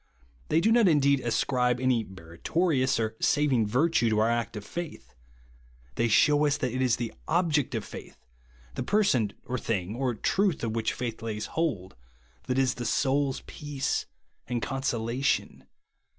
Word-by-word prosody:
They 160 Hz, -, +3 dB
do 220 Hz, -, +3 dB
not 230 Hz, -3 st, +5 dB
indeed 140 Hz, -4 st, +4 dB
ascribe 125 Hz, +1 st, +1 dB
any 125 Hz, -3 st, +2 dB
meritori 105 Hz, -, -1 dB
ous 130 Hz, -2 st, +1 dB
or 110 Hz, -1 st, -1 dB
saving 135 Hz, -7 st, +2 dB
virtue 125 Hz, +1 st, +2 dB
to 110 Hz, -, +1 dB
our 110 Hz, +2 st, +3 dB
act 115 Hz, -1 st, -2 dB
of 105 Hz, -, -7 dB
faith. 150 Hz, -, -7 dB, 0.8 s
They 115 Hz, -, +1 dB
shew 145 Hz, +6 st, +4 dB
us 145 Hz, 0 st, +1 dB
that 130 Hz, -4 st, -2 dB
it 130 Hz, -, -1 dB
is 125 Hz, -2 st, +3 dB
the 120 Hz, -2 st, -4 dB
object 160 Hz, -4 st, +1 dB
of -, -, -3 dB
faith, -, -, -10 dB, 0.3 s
— -, -, -28 dB
the 135 Hz, -, -4 dB
joerson, 125 Hz, -, +2 dB
or 125 Hz, +1 st, -3 dB
thing, 100 Hz, -2 st, -2 dB
or 125 Hz, -1 st, -1 dB
truth 190 Hz, -, 0 dB
of 115 Hz, -, -1 dB
which 115 Hz, -1 st, -1 dB
faith 120 Hz, -2 st, -4 dB
lays 110 Hz, -2 st, -4 dB
hold, 120 Hz, -, -2 dB, 0.3 s
— -, -, -34 dB
that 125 Hz, -, 0 dB
is 130 Hz, -1 st, +2 dB
the 120 Hz, -, -6 dB
soul's 135 Hz, +2 st, +1 dB
peace 145 Hz, -3 st, -3 dB, 0.4 s
and 120 Hz, -1 st, -1 dB
consolation. 130 Hz, 0 st, -1 dB
125 Hz, 170 wpm, -28 LUFS, 115-145 Hz, 0.8 s, not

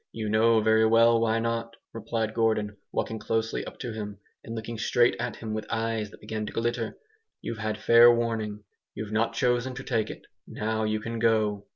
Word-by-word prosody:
"You 110 Hz, -2 st, -4 dB
know 110 Hz, +1 st, +4 dB
very 110 Hz, +1 st, +4 dB
well 115 Hz, +1 st, +5 dB
why 115 Hz, 0 st, +2 dB
not!" 115 Hz, 0 st, -2 dB, 0.2 s
replied 115 Hz, -1 st, -2 dB
Gordon, 110 Hz, -2 st, +1 dB, 0.2 s
walking 110 Hz, -, -2 dB
closely 115 Hz, 0 st, -1 dB
up -, -, -9 dB
to 120 Hz, -3 st, -4 dB
him, 105 Hz, -2 st, -6 dB, 0.3 s
and 115 Hz, -, -7 dB
looking 115 Hz, 0 st, -5 dB
straight 120 Hz, +2 st, +3 dB
at 120 Hz, 0 st, -3 dB
him 110 Hz, -2 st, -6 dB
with 110 Hz, 0 st, -4 dB
eyes 115 Hz, -2 st, -1 dB
that -, -, -16 dB
began 110 Hz, 0 st, -4 dB
to -, -, -5 dB
glitter, 115 Hz, -1 st, -2 dB, 0.4 s
"you've 115 Hz, -, -5 dB
had 110 Hz, 0 st, -2 dB
fair 115 Hz, +2 st, +7 dB
warning. 110 Hz, -3 st, -1 dB, 0.3 s
You've 110 Hz, -1 st, -5 dB
not 115 Hz, +1 st, 0 dB
chosen 125 Hz, +1 st, +1 dB
to 135 Hz, -, -6 dB
take 115 Hz, -5 st, -1 dB
it. -, -, -9 dB, 0.2 s
Now 110 Hz, 0 st, -2 dB
you 110 Hz, 0 st, 0 dB
can 115 Hz, +1 st, -4 dB
go!" 110 Hz, -3 st, +1 dB
115 Hz, 195 wpm, -27 LUFS, 110-115 Hz, 0.4 s, fair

